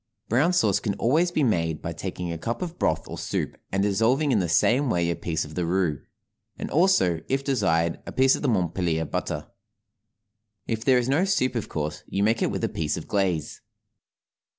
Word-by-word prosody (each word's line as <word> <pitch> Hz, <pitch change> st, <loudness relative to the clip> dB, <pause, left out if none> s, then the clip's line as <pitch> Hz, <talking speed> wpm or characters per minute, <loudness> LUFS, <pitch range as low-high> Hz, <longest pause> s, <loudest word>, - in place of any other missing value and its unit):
Brown 135 Hz, +10 st, +3 dB
sauce 110 Hz, -, +2 dB
can 100 Hz, -3 st, -2 dB
always 155 Hz, -, +2 dB
be 160 Hz, -4 st, 0 dB
made 80 Hz, -, +1 dB
by -, -, -5 dB
taking 90 Hz, -1 st, -5 dB
a 85 Hz, -, -4 dB
cup 115 Hz, -, -3 dB
of 175 Hz, -1 st, -7 dB
broth -, -, 0 dB
or -, -, -7 dB
soup -, -, -3 dB, 0.2 s
and 95 Hz, 0 st, +1 dB
dissolving 115 Hz, +9 st, +2 dB
in 115 Hz, -, +3 dB
the 90 Hz, -3 st, -1 dB
same 125 Hz, -, +3 dB
way 85 Hz, -5 st, +1 dB
a -, -, -1 dB
piece 80 Hz, -2 st, -2 dB
of 75 Hz, -, -11 dB
the 90 Hz, -, -1 dB
roux; 85 Hz, -4 st, 0 dB, 0.6 s
and -, -, -5 dB
also, 155 Hz, -, +3 dB
if 135 Hz, +1 st, 0 dB
desired, 85 Hz, -, +1 dB
a -, -, -5 dB
piece 130 Hz, 0 st, +4 dB
of -, -, -7 dB
Montpellier 85 Hz, -5 st, 0 dB
butter. 75 Hz, 0 st, -4 dB, 1.1 s
If 110 Hz, -1 st, -3 dB
there 130 Hz, 0 st, +4 dB
is 125 Hz, -1 st, 0 dB
no 145 Hz, +7 st, +2 dB
soup 190 Hz, -11 st, +1 dB
of 115 Hz, -4 st, -3 dB
course 75 Hz, -1 st, -4 dB
you 100 Hz, -, -1 dB
make 110 Hz, +2 st, +2 dB
it -, -, +2 dB
with -, -, -3 dB
a -, -, +3 dB
piece 75 Hz, -2 st, -2 dB
of 85 Hz, -, -7 dB
glaze. 90 Hz, -7 st, -1 dB
100 Hz, 200 wpm, -25 LUFS, 85-130 Hz, 1.1 s, piece